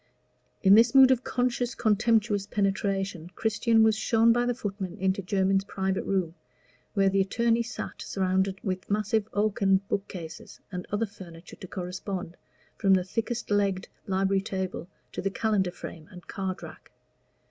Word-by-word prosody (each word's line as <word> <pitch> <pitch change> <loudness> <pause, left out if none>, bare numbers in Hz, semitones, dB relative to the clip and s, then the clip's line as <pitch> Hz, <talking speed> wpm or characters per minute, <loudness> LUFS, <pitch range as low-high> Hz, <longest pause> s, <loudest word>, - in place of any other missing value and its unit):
In 195 0 +7
this 230 +4 +6
mood 265 -1 +9
of 255 -1 +2
conscious, 245 0 -1
contemptuous 215 -2 +2
penetration, 195 -4 -1
Christian 225 +1 +2
was 220 -1 +4
shown 225 +1 +3
by 240 +1 +1
the 245 - 0
footman 195 -4 -5
into 190 +1 0
Jermyn's 195 +1 +1
private 190 -1 -2
room, 185 -4 0 0.6
where 195 -1 +4
the 195 0 +3
attorney 230 +4 +1
sat 235 - -6
surrounded 190 0 0
with 185 -2 -3
massive 210 +1 0
oaken 200 -2 +2
bookcases, 175 -5 -5
and 180 -1 -5
other 205 +2 +1
furniture 175 -5 -12
to 185 - -9
correspond, 180 0 -5 0.4
from 195 -2 +4
the 185 - +1
thickest 230 +4 -3
legged 200 -2 +1 0.2
library 195 0 +1
table 190 -4 -4 0.2
to - - -4
the 195 - 0
calendar 200 -2 0
frame 165 -2 -9
and 180 -2 -12
card 190 -1 -4
rack. - - -11
195 Hz, 150 wpm, -27 LUFS, 190-220 Hz, 0.6 s, mood